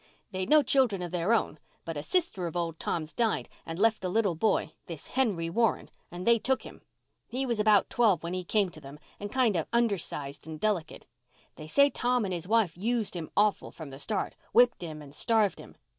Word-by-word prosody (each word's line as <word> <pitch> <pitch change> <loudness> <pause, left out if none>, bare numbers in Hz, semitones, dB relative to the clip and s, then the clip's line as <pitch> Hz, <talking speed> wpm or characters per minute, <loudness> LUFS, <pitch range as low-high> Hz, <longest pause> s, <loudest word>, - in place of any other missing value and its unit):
They'd 185 -1 -3
no 305 -1 +6
children 245 -8 +2
of 175 - -5
their 175 +3 0
own, 185 -9 +1 0.3
but 165 - -4
a 145 - -3
sister 195 - 0
of 170 - -5
old 165 -2 -2
Tom's 155 -1 -3
died 230 -3 0 0.2
and 165 0 -5
left 220 +1 +2
a 185 - -1
little 200 -1 +2
boy—this 165 -3 -2
Henry 210 -11 0
Warren—and 180 -2 -2
they 235 0 +5
took 265 +4 0
him. - - -12 0.5
He 260 +3 -2
was 235 -4 -1
about 210 -2 +4
twelve 210 -9 +3
when 170 +1 -4
he 185 0 -2
came 200 +1 +1
to 155 - -12
them, 140 +1 -10 0.2
and 205 0 -6
kind 250 -6 +2
of 165 - -1
undersized 175 -11 -1
and 155 -1 -7
delicate. 190 -6 -2 0.5
They 155 - -9
say 280 - +4
Tom 245 -2 +1
and 190 - -3
his 175 0 -4
wife 215 -5 +2
used 220 +1 -1
him 165 -3 -5
awful 210 0 +2
from 155 -4 -10
the 135 - -10
start—whipped 230 - +1
him 155 -3 -7
and 140 -1 -13
starved 220 +3 +2
him. - - -12
195 Hz, 205 wpm, -29 LUFS, 165-230 Hz, 0.5 s, no